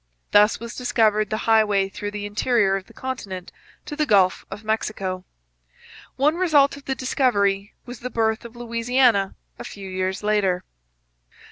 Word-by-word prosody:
Thus 210 +1 +5
was 235 +1 -8
discovered 215 -4 +2
the 215 - -3
highway 210 -3 +3
through 205 +1 -5
the 205 0 -5
interior 205 -1 +1
of 195 -1 -5
the - - -17
continent 200 -9 -6 0.3
to 295 - -6
the 305 0 0
Gulf 190 -4 +3
of 210 - -8
Mexico. 195 -4 -2 0.9
One 300 +5 +2
result 300 -7 +4
of 280 - -14
the 265 - -2
discovery 205 -7 0
was 245 -2 -9
the 250 - -5
birth 220 -2 0
of 235 0 -11
Louisiana 235 -3 +1 0.2
a - - -6
few 195 -1 -9
years 185 +1 -3
later. 195 -4 +1
215 Hz, 155 wpm, -23 LUFS, 195-245 Hz, 0.9 s, Thus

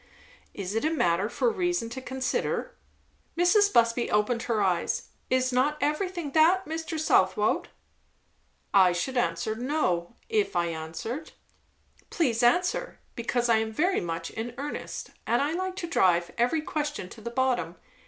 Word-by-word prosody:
"Is 195 -1 -4
it 225 - 0
a 310 - +2
matter 195 - +1
for 480 - +1
reason 355 - -1
to 260 - -5
consider?" 260 0 -2 0.6
Mrs. 405 +4 +4
Busby 235 - +3
opened 210 +3 +1
her 225 -2 +2
eyes. 185 -4 0 0.2
"Is 255 0 +1
not 280 +4 +2
everything 335 0 -1
that, 340 +5 +4
Mr. 320 0 -4
Southwode?" 310 - +2 1.1
"I 185 -3 +6
should 260 +9 -2
answer 170 -2 0
'no,' 230 - -1
if 425 - 0
I 170 -1 +1
answered." 165 - -5 0.8
"Please 250 -8 +1
answer, 350 +10 +1 0.2
because 240 +1 0
I 230 -1 +4
am 220 0 -1
very 355 - +1
much 165 -1 -4
in 230 +2 -5
earnest; 290 +2 -5 0.2
and 240 - +3
I 285 +2 +1
like 370 +1 -2
to 370 -3 -4
drive 175 - +2
every 250 +7 +1
question 300 -10 -3
to 225 - -12
the 235 - -5
bottom. 240 -9 0
250 Hz, 150 wpm, -27 LUFS, 210-315 Hz, 1.1 s, I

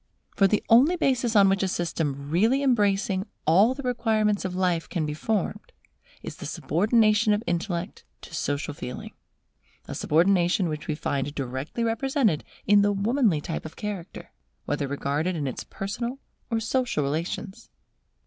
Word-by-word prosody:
For 195 - +5
the 210 +2 +1
only 265 +10 +6
basis 250 -8 +1
on 200 -1 +7
which 195 0 +2
a 190 - +1
system 150 -5 -2
really 225 - +3
embracing 205 -5 +1 0.2
all 200 +11 +5
the 280 - -7
requirements 220 -4 +1
of 185 -1 -3
life 180 -3 0
can 165 -4 -1
be 150 - -3
formed, 205 +5 -2 0.5
is - - -7
the - - -6
subordination 215 - +2
of 210 +2 -1
intellect 175 +2 -3 0.2
to - - -12
social 145 -2 -2
feeling: 125 -3 -7 0.7
a - - -5
subordination 175 +2 +2
which 155 -1 -5
we 155 - -1
find 145 -1 -2
directly 135 - -3
represented 230 - +1 0.2
in 205 0 +5
the 205 0 +3
womanly 205 - +1
type 160 - -4
of 160 - -9
character, 205 -5 -6 0.3
whether 145 -1 -1
regarded 145 +5 -1
in 150 -3 -2
its 130 - -4
personal 235 +6 -4 0.3
or 230 -2 0
social 240 - 0
relations. 165 +7 -4
195 Hz, 155 wpm, -26 LUFS, 160-225 Hz, 0.7 s, on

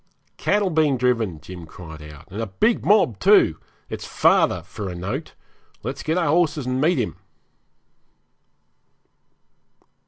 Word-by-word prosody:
'Cattle 205 -2 +1
being 155 -4 +2
driven,' 115 -9 0
Jim 85 +1 -10
cried 80 -2 -11
out; 75 -1 -12
'and 105 +4 -4
a 115 - -2
big 215 - +1
mob 190 - +3
too. - - +5 0.3
It's - - -6
father - - +3
for 105 -3 -6
a 90 - -6
note. 90 +2 -5 0.5
Let's - - -4
get 160 +3 -1
our 170 -4 +1
horses 155 -3 +2
and 130 +1 -1
meet 165 +4 +3
him.' 120 -5 -2
125 Hz, 135 wpm, -23 LUFS, -, 0.5 s, too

